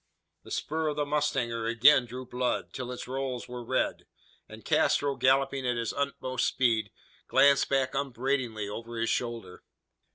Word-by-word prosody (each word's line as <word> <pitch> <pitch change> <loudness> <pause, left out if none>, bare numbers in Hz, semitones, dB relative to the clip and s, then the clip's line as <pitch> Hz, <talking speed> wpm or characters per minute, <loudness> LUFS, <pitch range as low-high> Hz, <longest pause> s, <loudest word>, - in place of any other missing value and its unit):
The - - -15
spur 160 +1 -2
of 150 - -1
the 145 0 0
mustanger 135 -6 -1
again 120 +2 +5
drew 125 +2 -7
blood, 125 0 -2
till 125 -1 -5
its 125 - -7
rowels 130 -1 -3
were 125 0 -7
red; - - -1 0.4
and - - -12
Castro, 140 -1 +2
galloping 135 +1 +2
at 120 -1 0
his 115 -2 -2
utmost 130 -3 -1
speed, 115 -5 +1 0.4
glanced 140 -1 +4
back 135 -1 +1
upbraidingly 130 -5 -1
over 115 +3 -7
his 115 0 0
shoulder. 115 -6 -4
130 Hz, 155 wpm, -29 LUFS, 120-140 Hz, 0.4 s, again